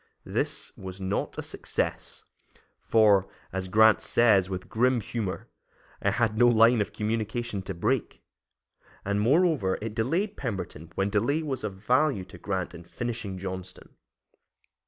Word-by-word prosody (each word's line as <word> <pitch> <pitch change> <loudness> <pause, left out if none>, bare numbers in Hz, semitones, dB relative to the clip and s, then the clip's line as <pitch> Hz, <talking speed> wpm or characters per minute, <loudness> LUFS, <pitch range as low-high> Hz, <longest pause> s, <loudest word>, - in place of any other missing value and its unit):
This - - -3
was 95 0 -8
not 95 +1 -2
a - - -3
success, - - -3 0.6
for, 105 -4 +4 0.3
as 95 -1 -2
Grant 110 +3 +5
says, 105 -6 +4
with 95 -1 -5
grim 125 +2 +2
humor, 105 -3 -4 0.5
"I - - +2
had 115 -3 +1
no 120 - +7
line 115 0 +5
of 105 - -2
communication 110 0 -2
to 95 -1 -6
break"; 85 - -1 0.8
and, 100 +1 0
moreover, 140 - +3
it 110 0 -5
delayed 165 - -1
Pemberton 95 - -5
when 95 +1 0
delay 130 +10 +1
was 135 -6 -3
of 105 -3 -4
value 125 +1 +1
to 95 - -13
Grant 95 -4 -3
in 85 - -10
finishing 110 0 -4
Johnston. 95 0 -7
105 Hz, 140 wpm, -27 LUFS, 95-120 Hz, 0.8 s, no